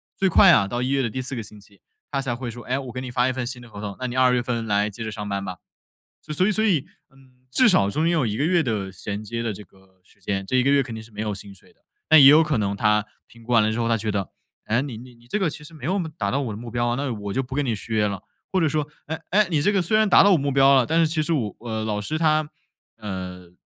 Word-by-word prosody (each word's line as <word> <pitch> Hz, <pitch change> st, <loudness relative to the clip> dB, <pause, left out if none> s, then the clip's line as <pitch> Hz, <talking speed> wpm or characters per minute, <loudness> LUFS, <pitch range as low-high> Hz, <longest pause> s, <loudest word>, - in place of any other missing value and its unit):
最 190 Hz, -1 st, +1 dB
快 185 Hz, +1 st, +7 dB
啊 100 Hz, -11 st, +4 dB
到 120 Hz, +4 st, -2 dB
1 130 Hz, -, -1 dB
月 135 Hz, 0 st, +1 dB
的 120 Hz, -, -1 dB
第 130 Hz, -, -5 dB
4 135 Hz, +1 st, -4 dB
个 115 Hz, -, -3 dB
星 105 Hz, 0 st, -11 dB
期， 100 Hz, 0 st, -21 dB, 0.3 s
他 140 Hz, -1 st, -1 dB
才 125 Hz, -3 st, -2 dB
会 120 Hz, -1 st, -5 dB
说： 120 Hz, -, -10 dB
“哎， 130 Hz, +2 st, 0 dB
我 130 Hz, -3 st, -6 dB
给 130 Hz, -, -5 dB
你 130 Hz, -, -6 dB
发 125 Hz, 0 st, +1 dB
一 -, -, +1 dB
份 130 Hz, -2 st, -4 dB
新 125 Hz, -1 st, -2 dB
的 120 Hz, -, -13 dB
合 100 Hz, -1 st, -9 dB
同， 100 Hz, -2 st, -5 dB
那 130 Hz, -, -3 dB
你 125 Hz, 0 st, -4 dB
2 130 Hz, -1 st, +4 dB
月 120 Hz, -1 st, +1 dB
份 115 Hz, -2 st, -2 dB
来 105 Hz, 0 st, +1 dB
接 115 Hz, +3 st, -7 dB
着 110 Hz, -, -4 dB
上 105 Hz, -1 st, -6 dB
班 100 Hz, -1 st, -3 dB
吧。” 90 Hz, -1 st, -6 dB, 0.6 s
所 155 Hz, +5 st, 0 dB
以 215 Hz, -, +2 dB
所 215 Hz, +2 st, +1 dB
以， 165 Hz, -6 st, +1 dB, 0.2 s
嗯， 130 Hz, -1 st, -24 dB
至 245 Hz, -, +4 dB
少 100 Hz, -, +3 dB
中 155 Hz, +10 st, -1 dB
间 170 Hz, -, +2 dB
有 155 Hz, -7 st, +1 dB
1 105 Hz, -1 st, -2 dB
个 140 Hz, -, -1 dB
月 170 Hz, +1 st, +3 dB
的 105 Hz, -7 st, -2 dB
衔 100 Hz, +3 st, -6 dB
接 115 Hz, +2 st, -4 dB
的 115 Hz, -3 st, -2 dB
这 105 Hz, -, -10 dB
个 95 Hz, -1 st, -26 dB
时 -, -, -27 dB
间， 95 Hz, -1 st, -3 dB
这 130 Hz, -, 0 dB
1 125 Hz, -, +3 dB
个 140 Hz, -, +2 dB
月 140 Hz, -1 st, +4 dB
肯 120 Hz, -3 st, -8 dB
定 110 Hz, -, -6 dB
是 110 Hz, -, -15 dB
没 105 Hz, +1 st, -6 dB
有 105 Hz, -1 st, -2 dB
薪 100 Hz, 0 st, -9 dB
水 -, -, -19 dB
的。 -, -, -37 dB, 0.3 s
但 160 Hz, -, +9 dB
也 135 Hz, -, +9 dB
有 150 Hz, +3 st, +8 dB
可 155 Hz, -5 st, 0 dB
能 100 Hz, -1 st, -1 dB
他 105 Hz, 0 st, +2 dB, 0.2 s
评 115 Hz, -1 st, -18 dB
估 125 Hz, -, -7 dB
完 115 Hz, -, +6 dB
了 110 Hz, +1 st, +1 dB
之 115 Hz, -, -3 dB
后 115 Hz, -, 0 dB
他 115 Hz, -, +2 dB
觉 105 Hz, -1 st, -2 dB
得： 100 Hz, -2 st, -3 dB, 0.3 s
“哎， 115 Hz, +4 st, +1 dB
你 130 Hz, -6 st, -6 dB
你 125 Hz, +1 st, -12 dB
你 120 Hz, 0 st, -22 dB
这 210 Hz, -, -1 dB
个 190 Hz, -4 st, +1 dB
其 150 Hz, 0 st, -6 dB
实 165 Hz, -, -12 dB
没 140 Hz, -3 st, -9 dB
有 185 Hz, -, 0 dB
我 200 Hz, -, 0 dB
们 160 Hz, -3 st, -4 dB
达 100 Hz, -2 st, -1 dB
到 140 Hz, -, 0 dB
我 120 Hz, -5 st, -3 dB
的 -, -, -7 dB
目 120 Hz, 0 st, -8 dB
标 120 Hz, 0 st, 0 dB
啊， 120 Hz, -, 0 dB
那 135 Hz, -1 st, -2 dB
我 100 Hz, -2 st, -6 dB
就 135 Hz, -, 0 dB
不 130 Hz, +1 st, -9 dB
跟 145 Hz, +1 st, 0 dB
你 115 Hz, -3 st, 0 dB
续 110 Hz, +2 st, -6 dB
约 105 Hz, -1 st, +2 dB
了。” 100 Hz, -2 st, -5 dB, 0.3 s
或 190 Hz, -, +2 dB
者 160 Hz, -, +2 dB
说， 150 Hz, 0 st, -1 dB, 0.2 s
“哎， 160 Hz, +1 st, -5 dB
哎， 210 Hz, 0 st, +3 dB
你 150 Hz, -2 st, +2 dB
这 205 Hz, -, +3 dB
个 195 Hz, -, +2 dB
虽 180 Hz, +5 st, 0 dB
然 215 Hz, -1 st, +3 dB
达 -, -, +7 dB
到 200 Hz, -, +5 dB
我 175 Hz, -, +5 dB
目 140 Hz, 0 st, -1 dB
标 135 Hz, 0 st, +5 dB
了， 130 Hz, -3 st, +3 dB
但 165 Hz, +2 st, +2 dB
是 165 Hz, -, +5 dB
其 155 Hz, 0 st, 0 dB
实 165 Hz, -, -1 dB
我” 110 Hz, -9 st, -2 dB
呃， 110 Hz, 0 st, -2 dB
老 105 Hz, -1 st, -2 dB
师 155 Hz, +10 st, -2 dB
他， 155 Hz, -2 st, +2 dB, 0.5 s
呃， 90 Hz, -4 st, -7 dB
125 Hz, 340 characters per minute, -23 LUFS, 105-150 Hz, 0.6 s, 但